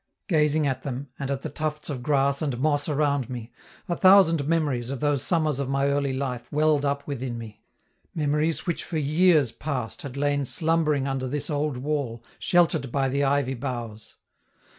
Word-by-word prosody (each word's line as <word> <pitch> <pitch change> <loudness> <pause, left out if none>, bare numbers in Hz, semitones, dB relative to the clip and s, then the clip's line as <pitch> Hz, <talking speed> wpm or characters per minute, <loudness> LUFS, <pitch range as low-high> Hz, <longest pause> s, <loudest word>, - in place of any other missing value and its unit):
Gazing 155 -4 +2
at 130 -2 -1
them, 135 +1 -5
and 140 -1 -3
at 140 -1 -2
the - - -3
tufts 155 -1 -3
of 140 -5 -4
grass 140 +1 +1
and 140 -6 -1
moss 145 +2 0
around 145 -3 +1
me, 120 -2 -6 0.4
a 175 - -1
thousand 175 -6 +5
memories 145 -7 0
of 135 -1 -4
those 145 -1 +1
summers 155 -2 +1
of 140 -2 -2
my 135 +1 +1
early 140 -1 0
life 130 -2 -4
welled 150 -1 +2
up 140 0 -1
within 130 -4 -4
me, 110 -2 -9 0.5
memories 150 +1 0
which 175 - -2
for 165 - -4
years 155 -2 +3
past 130 -6 -4
had 140 -1 -7
lain 145 0 +1
slumbering 155 -1 +1
under 135 -1 -2
this 145 +3 -2
old 145 -2 -1
wall, 130 -4 -3 0.2
sheltered 160 -7 +2
by 135 0 +1
the 140 +2 0
ivy 140 -1 +1
boughs. 120 -4 -6
140 Hz, 180 wpm, -25 LUFS, 130-150 Hz, 0.5 s, thousand